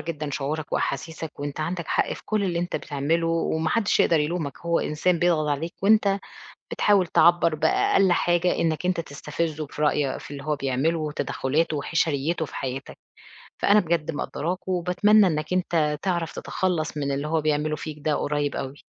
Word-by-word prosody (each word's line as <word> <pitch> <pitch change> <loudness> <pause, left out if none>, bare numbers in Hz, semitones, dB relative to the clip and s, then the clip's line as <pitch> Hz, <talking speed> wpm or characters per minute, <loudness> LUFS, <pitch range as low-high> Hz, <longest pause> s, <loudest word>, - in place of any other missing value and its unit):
جدًا 155 -3 -4
شعورك 145 +3 -3
وأحاسيسك، 160 +3 -3
وأنت 145 +1 -4
عندك 170 +1 -3
حق - - +1
في - - -8
كُلّ 215 -2 0
اللي 175 -3 -1
أنت 175 +1 -2
بتعمله، 155 +4 -1
وما 165 -1 0
حدش 210 +4 +2
يقدر 165 -3 +4
يلومك، 150 -2 -2
هو 170 0 +1
إنسان 170 +3 0
بيضغط 160 -3 +2
عليك، 155 +4 -2
وأنت 200 -1 +4 0.5
بتحاول 200 -3 +3
تعبّر 170 -1 +4
بأقل 170 +4 +3
حاجة، 175 0 +2
إنك 165 +1 0
أنت 180 -2 +1
تستفزُه 155 +1 -3
في 150 - -7
رأي 145 -2 +1
في - - -11
اللي 140 -1 -7
هو 155 0 0
بيعمله، 140 +4 0
وتدخلاته 150 +1 -1
وحشريته 160 +1 0
في - - -12
حياتك، 130 0 -5 0.6
فأنا 205 +1 +5
بجد 165 -3 0
مقدّراك، 165 +5 -4
وباتمنى 190 +3 +4
إنك 155 0 -2
أنت 160 -5 +1
تعرف 170 -4 -1
تتخلص 170 -5 -2
من 140 -1 -1
اللي 140 +2 -2
هو 160 0 +1
بيعمله 155 0 0
فيك 155 0 -7
ده 150 0 +1
قريب 145 -1 -1
أوي. 135 +1 -6
160 Hz, 170 wpm, -25 LUFS, 150-175 Hz, 0.6 s, فأنا